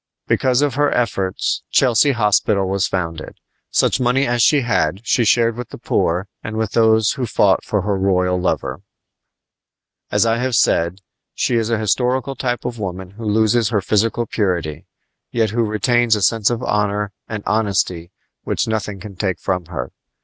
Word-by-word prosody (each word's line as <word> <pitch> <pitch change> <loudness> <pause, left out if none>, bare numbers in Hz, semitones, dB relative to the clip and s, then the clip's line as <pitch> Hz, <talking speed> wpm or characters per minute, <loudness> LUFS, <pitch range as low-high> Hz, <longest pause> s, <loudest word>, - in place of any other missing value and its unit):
Because 130 +1 +2
of 145 -2 0
her 145 +2 +2
efforts 100 -6 -1
Chelsea 130 +2 +3
Hospital 105 -3 +2
was 100 +1 0
founded. 80 -4 -4 0.3
Such - - +2
money 130 +2 +2
as 120 -1 0
she 145 +3 +4
had 95 -3 -1
she 120 - +2
shared 115 +1 +3
with 125 -1 -7
the - - -9
poor 90 +4 0 0.2
and 105 +1 -5
with 110 -2 -1
those 110 -1 +3
who - - -5
had 120 - -2
fought 100 -3 +3
for 105 -3 -1
her 105 -1 0
royal 90 -1 +1
lover. 90 - -2 1.3
As - - +2
I 115 0 +2
have 125 -1 0
said, 85 -1 +1 0.3
she 120 - 0
is 115 -1 0
a 115 - +1
historical 125 +5 0
type 125 -2 -3
of 125 -1 -4
the - - -8
woman 95 -1 -5
who 110 +3 -9
loses 110 +1 +2
her 110 -4 +1
physical 110 +4 0
purity, 90 -9 -2 0.4
yet 110 -3 0
who 120 +2 0
retains 115 +2 +2
a 105 - -2
sense 110 +1 +3
of 120 0 -3
honor 105 -1 0 0.2
and 110 -2 -5
of - - -13
honesty 95 -5 0 0.3
which - - -1
nothing 105 -3 -3
can 100 0 -10
take 95 -2 -2
from 90 -2 -2
her. 70 -7 -5
105 Hz, 180 wpm, -19 LUFS, 95-120 Hz, 1.3 s, she